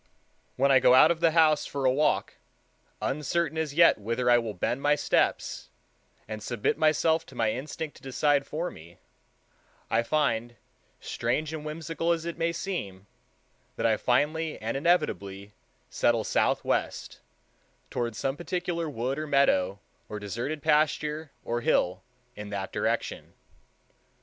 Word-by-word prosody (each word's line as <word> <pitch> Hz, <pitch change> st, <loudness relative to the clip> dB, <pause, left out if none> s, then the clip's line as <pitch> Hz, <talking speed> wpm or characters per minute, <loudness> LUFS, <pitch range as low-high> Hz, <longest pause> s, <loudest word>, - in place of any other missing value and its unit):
When 140 Hz, +2 st, +3 dB
I 135 Hz, -, +7 dB
go 125 Hz, -, +6 dB
out 155 Hz, +5 st, +7 dB
of 170 Hz, -, -1 dB
the 165 Hz, 0 st, +4 dB
house 155 Hz, -2 st, +3 dB
for 140 Hz, -1 st, -3 dB
a 130 Hz, -, +5 dB
walk, 150 Hz, +3 st, +1 dB, 0.7 s
uncertain 155 Hz, +4 st, -1 dB
as 150 Hz, -3 st, -3 dB
yet 170 Hz, -6 st, +6 dB
whither 115 Hz, +4 st, 0 dB
I 120 Hz, -, +6 dB
will 110 Hz, -3 st, -5 dB
bend 120 Hz, +8 st, -1 dB
my 145 Hz, +1 st, +3 dB
steps, -, -, 0 dB, 0.6 s
and 110 Hz, 0 st, -6 dB
submit 115 Hz, 0 st, -1 dB
myself 160 Hz, +1 st, +2 dB
to 130 Hz, -, -14 dB
my 110 Hz, -2 st, +1 dB
instinct 150 Hz, +4 st, -6 dB
to -, -, -18 dB
decide 140 Hz, +1 st, +1 dB
for 165 Hz, +4 st, -3 dB
me, 85 Hz, +2 st, -14 dB, 0.9 s
I 115 Hz, -, +3 dB
find, 120 Hz, -3 st, 0 dB, 0.4 s
strange 150 Hz, +7 st, -2 dB
and 155 Hz, -1 st, -5 dB
whimsical 165 Hz, +2 st, -2 dB
as 165 Hz, -1 st, -4 dB
it 170 Hz, -, -5 dB
may 165 Hz, +1 st, +1 dB
seem, 160 Hz, -, -5 dB, 0.7 s
that 115 Hz, -, -2 dB
I 110 Hz, -1 st, +4 dB
finally 150 Hz, +8 st, 0 dB
and 115 Hz, +3 st, -3 dB
inevitably 105 Hz, -, 0 dB, 0.4 s
settle 115 Hz, -2 st, +2 dB
southwest, -, -, -1 dB, 0.7 s
toward 120 Hz, -2 st, -2 dB
some 135 Hz, +4 st, -2 dB
particular 175 Hz, 0 st, -3 dB
wood 130 Hz, +1 st, -3 dB
or 155 Hz, -, -4 dB
meadow 100 Hz, -10 st, +2 dB, 0.3 s
or 105 Hz, -, -5 dB
deserted 120 Hz, +9 st, -4 dB
pasture 150 Hz, 0 st, +1 dB, 0.2 s
or 120 Hz, 0 st, -1 dB
hill 90 Hz, -5 st, +1 dB, 0.3 s
in 105 Hz, 0 st, -7 dB
that 100 Hz, -2 st, -4 dB
direction. -, -, -2 dB
140 Hz, 145 wpm, -27 LUFS, 115-155 Hz, 0.9 s, I